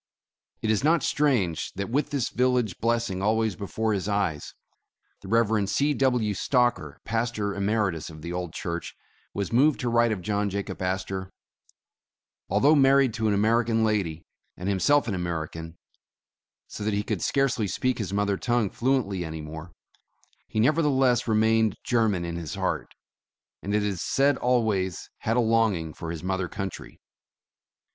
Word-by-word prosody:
It 110 - +2
is 110 - +1
not 160 +2 +3
strange, 115 - +1
that 100 +3 -4
with 145 +3 0
this 140 -5 -1
village 125 -5 +1
blessing 115 -5 0
al 110 +3 +2
ways 110 -4 0
before 110 +3 -2
his 100 0 -2
eyes, 95 -8 -1 0.7
the 95 - -11
Rev. 110 -2 +2
C. 145 +7 +2
W. 125 -6 +1
Stocker, 120 - +1
pastor 115 -3 -1
emeritus 100 -4 -1
of 80 -1 -11
the 85 - -5
old 90 -2 -3
church, 85 0 -5 0.4
was 100 +2 -3
moved 140 +5 +4
to 125 - 0
write 120 0 +3
of 95 -5 -3
John 105 0 0
Jacob 100 -1 -5
Astor: 95 0 -3 1.2
Although 145 +3 +4
married 135 -3 +4
to 110 0 -1
an 105 - +2
American 115 +2 +2
lady, 95 -7 -1 0.3
and 90 - -5
him 100 -1 0
self 145 +8 +3
an 110 - -1
American, 85 -2 -4 0.9
so - - -8
that 105 0 0
he 105 - 0
could - - -3
scarcely 135 -6 +1
speak 125 +7 -1
his 105 -3 -3
mother 100 0 0
tongue 120 -4 0
fluently 115 -8 0
any 80 -1 -6
more, 80 +3 -8 0.8
he 110 - -3
nevertheless 135 -2 +3
re 110 -1 +2
mained 110 -1 +3
German 110 -7 +1
in 85 0 -4
his 80 -4 -5
heart, - - -3 0.7
and 100 +1 -2
it 105 - +2
is 100 -4 -2
said 140 +1 +2
always 110 -8 0
had 115 +2 0
a - - +4
longing 110 -9 +1
for 85 - -7
his 80 -2 -5
mother 95 0 -1
country. 95 0 -7
105 Hz, 165 wpm, -26 LUFS, 95-120 Hz, 1.2 s, moved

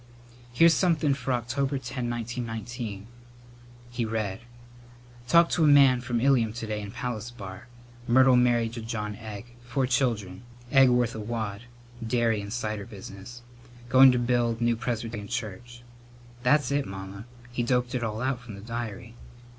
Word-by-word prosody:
"Here's 165 +7 +6
somethin' 160 -6 +2
for 135 -1 -3
October 130 +3 -1
10, 125 -1 -4
1919." 115 -2 -5 0.9
He 120 0 -2
read: 110 -4 -2 0.9
"'Talked 170 +2 +5
to 165 - +2
a - - +5
man 135 -4 +6
from 120 -1 -1
Ilium 120 -4 +3
to 115 -1 -5
day 105 -1 -3
in 100 - -7
Palace 120 0 -4
Bar. 105 0 -10 0.4
Myrtle 130 +1 +6
married 120 -2 +2
to 120 - -6
John 110 -2 -4
Egg. 110 +1 -9
Four 130 +2 -1
children. 120 -7 -1 0.3
Egg 135 -2 +6
worth 120 -1 +2
a 110 - -6
wad. 110 -1 -4 0.4
Dairy 115 -2 +1
and 100 0 -7
cider 110 -3 -3
business. 100 +4 -10 0.5
Going 130 +1 +8
to 125 - +1
build 120 -1 +1
new 120 0 +2
Presbyterian 115 -3 -4
church.' 120 +2 -6 0.6
That's 140 +3 +3
it, 140 0 0
Mamma. 95 +2 -8 0.3
He 120 - -2
doped 125 +1 0
it 125 -2 -1
all 110 +1 -3
out 130 -2 0
from 115 -4 -9
the 100 - -10
diary." 115 0 -6
120 Hz, 155 wpm, -27 LUFS, 110-125 Hz, 0.9 s, Going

